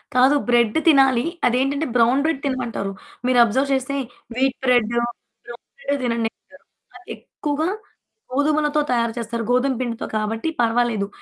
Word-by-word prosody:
కాదు 260 +3 +5
బ్రెడ్ 240 0 +3
తినాలి. 270 -5 +5 0.2
అదేంటంటే 275 +5 0
బ్రౌన్ 245 +4 +4
బ్రెడ్ 315 -3 -1
తినమంటారు. 240 -7 -2 0.3
మీరు 250 -1 +3
అబ్జర్వ్ 260 +5 0
చేస్తే 265 +1 -1 0.4
వీట్ 265 0 +1
బ్రెడ్డు, 240 -2 +3 0.5
బ్రౌన్ 240 0 -11
బ్రెడ్డే 285 -12 -2
తినండి 230 -2 0
అంటారు. 280 0 -22 0.3
అదెక్కువగా 310 -3 -4 0.6
గోధుమలతో 300 +2 +1
తయారు 235 -2 +1
చేస్తారు. 230 0 -3
గోధుమ 260 +2 +2
పిండితో 235 -2 -3
కాబట్టి 220 +6 -2
పర్వాలేదు. 230 -3 +1
250 Hz, 130 wpm, -21 LUFS, 235-280 Hz, 0.6 s, కాదు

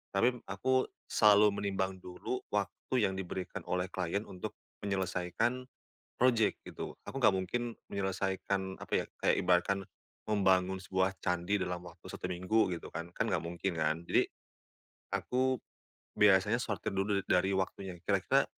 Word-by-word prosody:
tapi 125 +5 +3
aku 130 +7 +1 0.2
selalu 105 -1 +6
menimbang 95 -2 -1
dulu 90 +8 -4
waktu 105 +4 -1
yang 95 -1 0
diberikan 95 0 -4
oleh 90 +1 -1
klien 95 +3 -1
untuk 90 -4 -7 0.2
menyelesaikan 95 +6 -1 0.5
project 120 -4 +3
gitu. - - -7
Aku - - -7
nggak 105 - +8
mungkin 120 +6 -1 0.2
menyelesaikan 95 0 -1
apa - - -14
ya, - - -2 0.2
kayak - - +5
ibarat 90 -1 +4
kan 100 +1 0 0.5
membangun 95 -3 +3
sebuah 95 0 +1
candi 90 +3 +1
dalam 90 -2 -2
waktu 90 - -13
1 - - -5
minggu 95 +4 +2
gitu - - -10
kan, 85 +1 -4
kan - - +2
nggak - - +1
mungkin 85 +3 -2
kan. 80 +2 +1
Jadi - - +3 0.9
aku 130 +1 +1 0.6
biasanya 105 +3 +5
sortir 100 -3 -2
dulu 100 +1 +1
da 90 -2 +4
dari 95 - -1
waktunya 95 -1 -2
kira-kira - - +3
95 Hz, 145 wpm, -33 LUFS, 90-105 Hz, 0.9 s, nggak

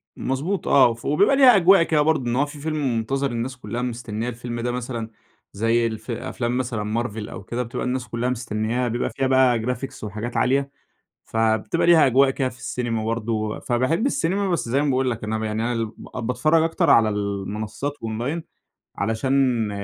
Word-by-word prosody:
مضبوط 150 +9 -2
آه، 130 -4 +5
ف 115 - -14
وبيبقى 195 - +3
ليها 260 -4 +7
أجواء 190 -1 +6
كده 155 -2 +2
برضه، 155 -3 +1
إن 120 - 0
هو 140 +3 +2
في 145 0 -10
فيلم 145 -5 -1
منتظر، 135 +4 -1
الناس 120 +2 -4
كلها 120 +1 -5
مستنية 120 -2 -3
الفيلم 120 0 -6
ده 120 +1 -1
مثلًا، 120 -2 -4 0.4
زي 115 +3 +2
الف 110 +1 -6
أفلام 120 0 -3
مثلًا 115 -3 -1
Marvel 110 -2 -6
أو 95 - -8
كده، 120 +5 -3
بتبقى 115 - -4
الناس 125 0 -2
كلها 120 +1 -2
مستنياها، 120 0 -1
بيبقى 120 +2 -1
فيها 135 - -1
بقى 130 -2 +4
Graphics 125 +2 -4
وحاجات 110 +3 -4
عالية، 140 +2 +1 0.5
فبتبقى 110 +9 +1
ليها 165 -4 +6
أجواء 135 +2 +4
كده 130 -1 -1
في 125 - -12
السينما 115 -4 -3
برضه 115 0 -2
و 110 -1 -2
فباحب 130 - 0
السينما، 200 -6 0
بس 170 -9 -1
زي 135 +4 +1
ما 150 - 0
باقول 130 0 +1
لك 115 -2 -4
أنا 110 +1 -2
ب 110 - -4
يعني 110 +1 -2
أنا 120 - 0
ال 115 -2 -2 0.3
باتفرج 155 +7 +2
أكتر 165 0 +1
على 115 -2 +6
المنصات 105 +6 -3
أونلاين، 120 +9 -3 0.5
علشان 115 +2 +1
120 Hz, 190 wpm, -23 LUFS, 115-135 Hz, 0.5 s, ليها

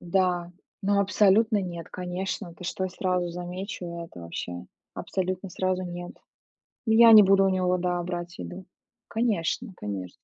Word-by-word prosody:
да, 175 -1 0 0.3
ну 200 +1 +3
абсолютно 205 +2 +4
нет, 170 -3 -6
конечно, 180 0 -4
ты 180 - -11
что, 190 +1 -2
я 185 - -3
сразу 180 -1 -1
замечу 180 +2 -6 0.2
это 125 - -12
вообще, 90 +1 -6 0.3
абсолютно, 185 0 -3
сразу 185 +1 -1
нет. 175 0 -6 0.7
Я 230 0 +7
не 215 -2 +10
буду 195 0 +5
у - - +3
него, 185 -1 +1
да, 180 0 -1
брать 175 0 -5
еду, 185 +1 -7 0.4
конечно 220 -1 -1
конечно. 95 -3 -5
185 Hz, 145 wpm, -27 LUFS, 175-195 Hz, 0.7 s, не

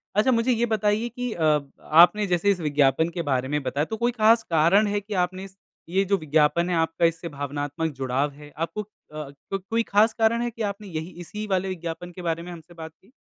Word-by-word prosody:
अच्छा 220 +5 +4
मुझे 235 +2 +2
ये 235 0 +2
बताइए 215 +1 0
कि 245 0 -4
अ, 155 -2 +2 0.2
आपने 180 +6 +5
जैसे 180 +3 +2
इस 185 - -1
विज्ञापन 145 +1 +2
के 170 0 -4
बारे 130 0 0
में 150 +1 -1
बताया 140 +4 -1
तो 220 - -5
कोई 240 +2 +1
खास 225 0 +4
कारण 170 +6 +4
है 205 0 0
कि 205 +1 -7
आपने 185 +1 -9
इस 195 0 -12 0.3
ये 190 +2 +2
जो 200 +1 +2
विज्ञापन 155 +2 +2
है 175 - +1
आपका 165 +1 +1
इससे 165 +1 -1
भावनात्मक 145 +2 -3
जुड़ाव 135 +2 -1
है? 145 +1 -14
आपको 165 +6 -3
अ, 205 - -11 0.7
क 195 - -1
कोई 230 0 +1
खास 220 +2 +3
कारण 230 +1 +2
है 240 - -1
कि 230 - -9
आपने 205 0 -3
यही 160 0 -5
इसी 210 +5 -6
वाले 190 -1 0
विज्ञापन 175 0 -6
के 180 - -10
बारे 170 -1 -2
में 180 - -8
हमसे 170 0 -12
बात 160 -1 -9
की? 205 +6 -25
175 Hz, 225 wpm, -25 LUFS, 160-210 Hz, 0.7 s, आपने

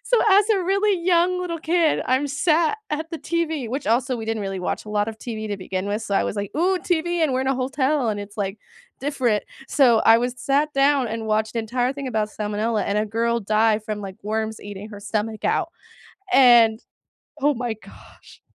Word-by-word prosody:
So - - +2
as 405 +1 +5
a 395 -4 +2
really 395 +2 +1
young 360 +1 +2
little 345 -2 -3
kid, 325 0 +1
I'm 260 +3 +1
sat 310 +6 +1
at 310 +2 -3
the 330 - -5
TV, 320 -7 -2
which 265 +5 -4
also 250 +3 +1
we 225 - -5
didn't 225 -2 -2
really 195 -1 -4
watch 180 - -3
a - - -11
lot 210 0 0
of 220 - -6
TV 220 -3 -5
to 205 - -3
begin 185 0 -4
with, 205 +2 -2
so 205 - -3
I - - +3
was - - -3
like, 200 -1 -3
"Ooh, 365 +4 +2
TV 345 0 0
and 300 -4 +2
we're 255 - 0
in - - -4
a 270 - +2
hotel, 265 0 0
and 205 - -3
it's, 205 +1 -10
like, 200 0 -3 0.4
different." 260 -6 0 0.3
So, 245 -6 +4
I 225 0 +7
was 245 +1 -2
sat 290 +2 +1
down 275 -2 +3
and 225 0 -4
watched 215 0 0
the 230 - 0
entire 245 +3 -1
thing 275 -1 -5
about 215 -3 -1
salmonella, 210 +1 -1
and 205 +1 0
a 215 - 0
girl 230 +2 0
died 215 +1 +2
from, 215 -1 -4
like, 195 -2 -7
worms 220 +1 -3
eating 205 0 -8
her 205 -1 -9
stomach 215 +1 -3
out, 335 -3 0 0.6
and 235 -4 +6 0.6
oh 290 +2 +3
my 240 -3 -3
gosh. 220 - -17
235 Hz, 215 wpm, -23 LUFS, 215-300 Hz, 0.6 s, I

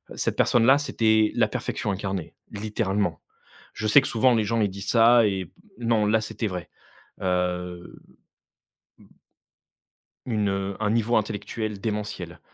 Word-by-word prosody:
cette - - -1
personne 115 -1 +3
là, 135 +3 +6
c'était 110 -6 +2
la - - +3
perfection 105 -1 -3
incarnée, 95 -3 -4 0.2
littéralement. 100 -5 -2 0.5
Je 110 - -5
sais 140 +7 +7
que - - -4
souvent 125 +2 +3
les 110 - +2
gens 115 +2 0
ils 105 - +2
disent 100 +2 -7
ça 115 -1 +6
et 95 -4 -3 0.3
non, 115 -3 +1
là 110 +1 +3
c'était 110 +1 -4
vrai. 90 -4 -6 0.5
Heu, 90 -1 -2 1.0
mmh - - -18 1.2
Une, 105 -4 0
heu, 95 0 -2
un 105 -1 0
niveau 115 +2 +1
intellectuel 105 0 -3
démentiel. 105 0 -4
105 Hz, 145 wpm, -25 LUFS, 95-115 Hz, 1.2 s, sais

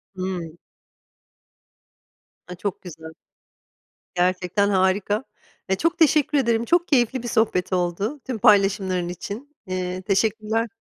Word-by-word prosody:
Hımm. 180 -3 -4 1.9
A, 180 - -7
çok 185 +1 -4
güzel. 160 -3 -10 1.1
Gerçekten 180 +2 +1
harika. 195 +4 +1 0.4
Ya, 190 - +1
çok 335 - 0
teşekkür 300 -2 +4
ederim. 235 -3 +1
Çok 345 +6 +2
keyifli 250 -2 +2
bir 240 - -5
sohbet 205 -5 +1
oldu, 185 - -1
tüm 250 -4 -3
paylaşımların 195 -3 +3
için. 225 - -7
Eee, 185 0 -3
teşekkürler. 220 +3 0
200 Hz, 110 wpm, -23 LUFS, 185-235 Hz, 1.9 s, teşekkür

